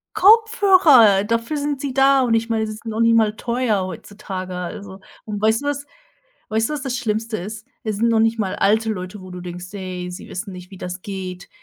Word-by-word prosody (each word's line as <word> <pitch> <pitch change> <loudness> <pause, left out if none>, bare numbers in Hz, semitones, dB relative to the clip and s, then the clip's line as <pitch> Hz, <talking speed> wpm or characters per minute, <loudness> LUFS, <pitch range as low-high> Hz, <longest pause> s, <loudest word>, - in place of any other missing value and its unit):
Kopfhörer, 375 - +6
dafür 230 +7 -1
sind 285 -1 -2
sie 275 -3 -3
da. 270 0 +5
Und 235 -2 +2
ich 225 +1 0
meine, 220 -1 0
sie 215 - -5
sind 230 +2 -14
noch 220 +1 -3
nicht 230 0 +5
mal 220 -1 +2
teuer 235 -5 0
heutzutage, 185 0 -7
also 190 +2 -7 0.2
und 205 -2 -5
weißt 220 +5 +2
du - - -5
was 290 0 -2 0.6
weißt 220 +1 0
du, - - -1
was 280 - -4
das 255 -2 -2
Schlimmste 220 +1 -2
ist? 210 +4 -7 0.2
Es 215 -2 -2
sind 230 +1 +2
noch 225 -1 +3
nicht 225 +1 +2
mal 195 -3 -1
alte 220 +2 +2
Leute, 185 +1 -7
wo 185 - -11
du 180 0 -7
denkst: 180 0 -7
„Ey, 185 -2 -5
sie 180 - -9
wissen 190 +1 -6
nicht, 180 0 -11
wie 190 - -10
das 180 +1 -6
geht.“ 185 -2 -6
220 Hz, 220 wpm, -21 LUFS, 190-240 Hz, 0.6 s, Kopfhörer